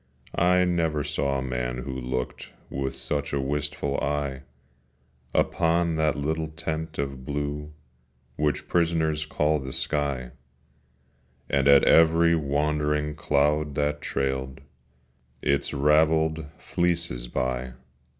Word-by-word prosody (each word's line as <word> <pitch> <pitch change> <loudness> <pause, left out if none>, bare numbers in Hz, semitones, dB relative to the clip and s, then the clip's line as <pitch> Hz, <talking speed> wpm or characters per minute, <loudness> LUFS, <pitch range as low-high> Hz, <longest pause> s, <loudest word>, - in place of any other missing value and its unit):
I 90 +1 +4
never 80 -4 +1
saw 70 -2 -1
a 65 - -2
man 60 -1 -2
who 65 0 -5
looked 65 0 -4 0.2
With 65 0 -3
such 70 +2 -1
a 70 - +1
wistful 70 0 -2
eye 70 -2 -2 0.9
Upon 85 0 +2
that 80 -1 +1
little 80 +2 -1
tent 80 0 -5
of 70 -2 -3
blue 75 +2 -3 0.6
Which 75 0 -1
prisoners 80 -3 +1
call 75 0 +1
the 65 -1 -6
sky, 70 -4 -2 1.2
And 70 -1 +2
at 70 -1 +7
every 85 +1 +5
wandering 75 0 0
cloud 75 0 +1
that 75 0 0
trailed 65 -1 -2 0.8
Its 70 0 +1
ravelled 80 +2 +3
fleeces 85 -9 -1
by. 65 0 -2
75 Hz, 110 wpm, -26 LUFS, 70-80 Hz, 1.2 s, at